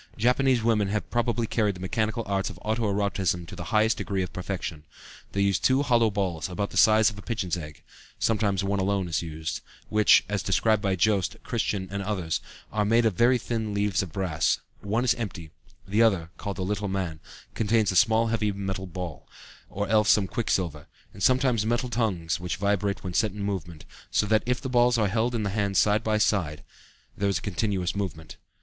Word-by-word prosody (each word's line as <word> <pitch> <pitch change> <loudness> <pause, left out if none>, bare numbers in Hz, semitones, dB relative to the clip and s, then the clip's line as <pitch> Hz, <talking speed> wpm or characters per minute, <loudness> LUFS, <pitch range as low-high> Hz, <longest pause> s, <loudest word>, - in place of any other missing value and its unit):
Japanese 125 +1 +2
women 110 -3 +2
have 105 +1 -2
probably 120 -1 0
carried 105 -3 0
the - - -10
mechanical 110 +5 -1
arts 100 -1 -1
of 95 - -10
auto 110 -1 0
erotism 95 -4 0
to - - -9
the 85 - -7
highest 110 +4 +2
degree 95 -2 -2
of 90 - -7
perfection. 90 -4 -5 0.5
They 100 - -1
use 100 -1 +2
two 130 +2 +3
hollow 120 -4 +3
balls 95 -6 -2
about 100 +3 -3
the - - -10
size 110 -1 +6
of 100 - -11
a - - -8
pigeon's 100 -7 -2
egg 75 -4 -9 0.3
(sometimes 100 -4 +1
one 100 0 0
alone 95 -1 0
is 80 -4 -1
used), 80 -1 -5 0.3
which, 105 -1 +5
as 100 -2 -1
described 110 +2 +2
by 95 -2 +1
Joest, 95 0 +1
Christian, 105 -5 -2
and 100 0 -3
others, 95 -5 -2 0.3
are 105 -1 +1
made 115 +3 +3
of 110 - +3
very 120 +7 +4
thin 110 -3 -3
leaf 100 -2 +1
of 95 -4 -6
brass; 90 -3 0 0.2
one 110 +4 -1
is 120 -2 +4
empty, 95 -9 -6 0.4
the 105 +3 +2
other 95 -7 +2
(called 100 -1 -5
the 95 - -2
little 100 +1 -2
man) 90 -5 -3 0.3
contains 110 -1 +2
a - - -4
small 110 +3 +4
heavy 110 -2 0
metal 95 -1 -4
ball, 85 -5 -7 0.4
or 100 +1 -3
else 105 0 +3
some 105 - +5
quicksilver, 90 -7 -2 0.3
and 100 - -11
sometimes 125 0 +3
metal 120 +3 0
tongues 95 -10 -1
which 90 -2 -3
vibrate 100 +1 0
when 90 -2 -4
set 105 +2 +1
in 105 -1 -5
movement; 85 -6 -4 0.2
so - - +1
that 110 0 +3
if 125 0 +1
the 135 - -5
balls 120 -1 +3
are 105 -3 +2
held 115 +4 0
in 110 - -1
the 100 - -1
hand 100 -2 0
side 105 +2 +3
by 110 -1 +1
side 85 -8 0 0.5
there 100 0 0
is 100 - +1
a - - -6
continuous 100 -2 -1
movement. 80 -6 -5
100 Hz, 205 wpm, -26 LUFS, 95-110 Hz, 0.5 s, size